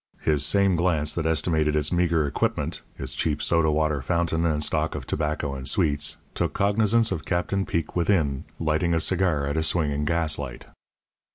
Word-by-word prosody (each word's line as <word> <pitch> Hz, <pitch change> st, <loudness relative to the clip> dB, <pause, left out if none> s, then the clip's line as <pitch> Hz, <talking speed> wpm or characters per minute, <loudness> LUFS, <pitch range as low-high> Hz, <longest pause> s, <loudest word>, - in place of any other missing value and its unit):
His 75 Hz, -2 st, +1 dB
same 100 Hz, +3 st, +2 dB
glance 80 Hz, -3 st, +2 dB
that 80 Hz, -1 st, -1 dB
estimated 80 Hz, -1 st, +1 dB
its 75 Hz, -1 st, +1 dB
meagre 85 Hz, -3 st, +2 dB
equipment, 70 Hz, -, -2 dB, 0.2 s
its 65 Hz, 0 st, -4 dB
cheap 75 Hz, +2 st, -1 dB
soda 85 Hz, -2 st, +2 dB
water 75 Hz, -2 st, +1 dB
fountain 85 Hz, +3 st, 0 dB
and 75 Hz, -2 st, 0 dB
stock 75 Hz, +1 st, 0 dB
of -, -, -5 dB
tobacco 75 Hz, -2 st, -2 dB
and 65 Hz, -1 st, -4 dB
sweets, 75 Hz, +1 st, +1 dB, 0.2 s
took -, -, -1 dB
cognizance 110 Hz, +2 st, +2 dB
of 85 Hz, -4 st, -3 dB
Captain 95 Hz, +2 st, -1 dB
Peek 80 Hz, -2 st, -2 dB
within 85 Hz, -7 st, +1 dB
lighting 80 Hz, +1 st, +1 dB
a -, -, +2 dB
cigar 85 Hz, -3 st, +1 dB
at 70 Hz, +2 st, -2 dB
a -, -, +2 dB
swinging 75 Hz, -3 st, 0 dB
gaslight. 75 Hz, -5 st, -2 dB
80 Hz, 170 wpm, -25 LUFS, 75-85 Hz, 0.2 s, same